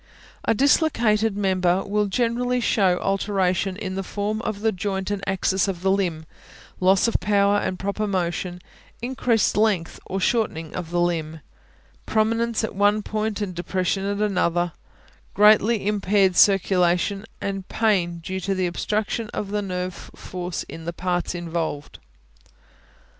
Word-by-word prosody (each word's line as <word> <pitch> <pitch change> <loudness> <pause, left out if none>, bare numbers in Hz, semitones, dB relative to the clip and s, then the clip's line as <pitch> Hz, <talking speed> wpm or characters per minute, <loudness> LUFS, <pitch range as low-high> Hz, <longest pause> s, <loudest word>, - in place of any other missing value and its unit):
A - - +2
dislocated 225 -7 +2
member 185 -2 +1
will 210 +1 0
generally 245 +4 0
show 195 -6 +2
alteration 195 -1 0
in 195 -3 -4
the 195 - -2
form 205 +3 -3
of 215 -3 -4
the 220 0 +2
joint 190 +1 -3
and 200 -1 -3
axis 190 +1 +1
of 185 -2 -4
the 190 - +3
limb; 175 -5 -1 0.5
loss 190 +3 +4
of 230 - +1
power 200 0 +3
and 185 - -2
proper 200 +3 -2
motion; 180 -1 -2 0.4
increased 240 -3 +1
length 205 -6 +1
or 195 - -2
shortening 180 -7 0
of 175 -3 -5
the 175 0 0
limb; 160 -2 -1 0.7
prominence 230 +1 +1
at 220 - -2
one 205 +2 +2
point 215 0 -2
and 195 -3 -3
depression 185 +2 -1
at 200 +1 -1
another; 175 -4 +1 0.6
greatly 210 +1 +5
impaired 200 -2 +2
circulation, 195 0 +3 0.2
and 195 -1 -4
pain 185 -6 +1
due 190 +2 -3
to 195 +1 -1
the 185 -1 0
obstruction 210 +5 -2
of 200 -1 -4
nerve 185 -3 -3
force 180 -1 -5
in 165 - -10
the 170 - -3
parts 175 0 -2
involved. 165 -4 -4
195 Hz, 140 wpm, -23 LUFS, 180-210 Hz, 0.7 s, greatly